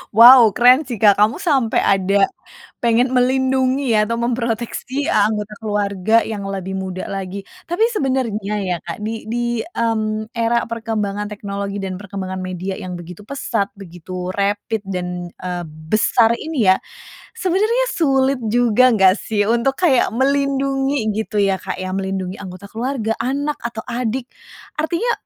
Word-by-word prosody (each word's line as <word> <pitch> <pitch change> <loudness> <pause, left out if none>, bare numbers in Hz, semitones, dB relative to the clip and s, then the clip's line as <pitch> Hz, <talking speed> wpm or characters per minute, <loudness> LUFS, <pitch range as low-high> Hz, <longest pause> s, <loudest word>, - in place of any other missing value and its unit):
Wow 235 -2 +9
keren 250 +3 +5
sih 240 - -3
Kak! 205 -1 +4
Kamu 215 +2 +4
sampai 275 - +1
ada 195 +1 +3 0.6
pengen 235 +2 +3
melindungi 260 0 +2
atau 220 +2 +1
memproteksi 240 +3 -2
anggota 210 0 +1
keluarga 205 0 +1
yang 210 -3 -4
lebih 190 -1 -4
muda 185 -1 -4
lagi, 195 0 -5 0.2
tapi 390 +7 +1
sebenarnya 255 - -1
ya 185 -2 -1
Kak 170 +4 -6
di 220 +1 -4
di, 240 -1 -1
mmm, 220 -7 -2
era 235 +1 +1
perkembangan 215 -3 -3
teknologi 200 -1 -4
dan 190 -1 -4
perkembangan 190 -1 -6
media 185 +1 -4
yang 180 -2 -6
begitu 180 +3 -10
pesat 225 -5 -2
begitu 180 0 -7
rapid 205 +2 -1
dan, 180 -2 -4
eee, 180 -1 -5 0.2
besar 225 +3 +3
ini 285 -9 -1
ya, 185 - +7 0.6
sebenarnya 430 +7 +1
sulit 270 -4 +2
juga 245 +2 +4
nggak 195 -6 +5
sih 205 -2 0
untuk 235 +5 +1
kayak 265 -7 +4
melindungi 275 -2 +1
gitu 215 0 -4
ya 190 -2 0
Kak, - - -5
ya, 185 0 -4
melindungi 190 -1 -3
anggota 190 +1 -9
keluarga, 230 -1 -2
anak, 285 +3 -2
atau 230 -1 -5
adik, 245 +1 -3 0.5
artinya 345 +10 0
220 Hz, 140 wpm, -19 LUFS, 195-255 Hz, 0.6 s, Wow